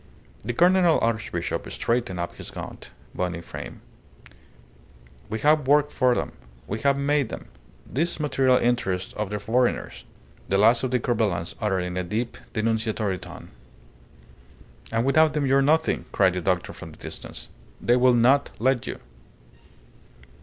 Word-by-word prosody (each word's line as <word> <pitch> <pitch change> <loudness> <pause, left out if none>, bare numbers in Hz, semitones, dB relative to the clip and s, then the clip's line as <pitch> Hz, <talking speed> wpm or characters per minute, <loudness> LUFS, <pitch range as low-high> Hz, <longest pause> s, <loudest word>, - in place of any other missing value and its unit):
The 120 +4 -2
Cardinal 175 +3 +4
Archbishop 115 -1 -2
straightened 115 -6 -1
up 85 - -4
his - - -8
gaunt, - - -8 0.2
bony 90 -2 -2
frame. 85 - -9 1.5
"We 110 - -2
have 150 -2 +3
worked 145 +1 +4
for 125 -2 +2
them; - - -2 0.3
we 110 - -4
have 140 +3 +2
made 140 -3 +1
them, - - -8 0.4
these 165 +6 -2
material 135 -4 +3
interests 95 -7 0
of 105 -2 -3
the 105 - -2
foreigners," 120 +4 -1 0.4
the 95 - +1
last 115 +4 +5
of 130 - -1
the 125 0 +1
Corbelans 110 -8 -1
uttered 95 -4 +1
in 90 0 -4
a 90 - 0
deep, 110 +7 -3 0.2
denunciatory 110 -3 -1
tone. - - -11 1.4
"And 115 +1 +1
without 155 +3 +4
them 150 -2 +1
you 135 0 +4
are - - +4
nothing," 160 +3 +2
cried 95 -2 +3
the 90 - -2
doctor 90 0 -1
from - - -10
the - - -16
distance. - - -8 0.3
"They 120 - +3
will 125 0 +5
not 130 +4 +4
let 130 +1 +1
you." - - -5
120 Hz, 155 wpm, -25 LUFS, 105-135 Hz, 1.5 s, last